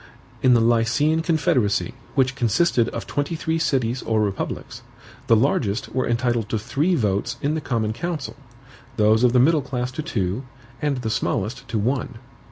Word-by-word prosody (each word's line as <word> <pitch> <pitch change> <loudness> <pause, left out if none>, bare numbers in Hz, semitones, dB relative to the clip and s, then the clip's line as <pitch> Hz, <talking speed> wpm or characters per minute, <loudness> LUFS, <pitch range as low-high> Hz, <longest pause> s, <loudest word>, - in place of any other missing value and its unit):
In 125 -1 +5
the 115 - +4
Lycian 120 +8 +2
confederacy, 155 - +1 0.2
which 130 -1 +2
consisted 120 0 +2
of 115 - -5
twenty 145 +4 -2
three 160 0 -1
CITIES 130 -6 0
or 110 -1 0
republics, 100 -2 -3 0.5
the 115 - +6
largest 110 -3 +1
were 130 0 0
entitled 120 -2 0
to 110 - 0
THREE 150 - 0
votes 105 - -1
in 145 +2 0
the 160 - -2
COMMON 115 -6 -1
COUNCIL, 160 +2 -4 0.6
those 110 +2 +4
of 125 - +5
the 125 - +5
middle 150 +4 +4
class 125 -1 -3
to 140 - -4
TWO, 105 - -2 0.4
and 145 -2 0
the 115 -3 -3
smallest 120 +5 -2
to 115 - -2
ONE. 125 +2 -1
125 Hz, 170 wpm, -23 LUFS, 110-145 Hz, 0.6 s, the